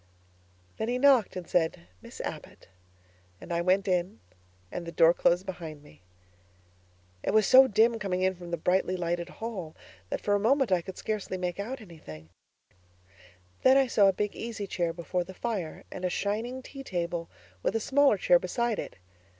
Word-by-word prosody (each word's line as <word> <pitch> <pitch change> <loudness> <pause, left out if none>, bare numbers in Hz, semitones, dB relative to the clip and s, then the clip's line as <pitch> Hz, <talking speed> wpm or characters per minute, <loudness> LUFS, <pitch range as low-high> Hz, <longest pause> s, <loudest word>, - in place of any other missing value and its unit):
Then 220 - -2
he 245 - 0
knocked 260 -4 +4
and 180 -2 -6
said, 160 - +1 0.2
'Miss - - -9
Abbott,' - - -8 0.7
and - - -6
I 170 - +1
went 185 +3 +2
in 180 +2 0 0.5
and 180 - -4
the - - -4
door 165 0 +5
closed 175 +2 +2
behind 160 -5 -7
me. 145 - -18 1.2
It - - -1
was 215 -1 +5
so 260 +4 +8
dim 225 +1 +3
coming 185 -2 -1
in 190 0 +2
from 175 -1 -10
the 170 - -2
brightly 185 +3 +1
lighted 175 0 -2
hall 195 -9 -6 0.3
that - - -2
for 205 - 0
a 205 - +3
moment 255 +2 +2
I 180 -2 +3
could 185 +2 -9
scarcely 210 -3 -3
make 180 0 -3
out 245 +5 -4
anything; 80 - -12 1.3
then 260 +1 +6
I 270 - +5
saw 210 -5 +4
a - - +6
big 205 +2 -2
easy 225 -3 -5
chair 175 -3 -1
before 175 +1 -3
the 190 +2 -11
fire 200 -9 -4
and 185 - -7
a 180 - +1
shining 225 +8 -2
tea 275 +1 -9
table 170 -5 -3 0.3
with - - -1
a - - +2
smaller 275 +5 +3
chair - - +4
beside 235 - -1
it. - - -6
190 Hz, 185 wpm, -28 LUFS, 175-230 Hz, 1.3 s, so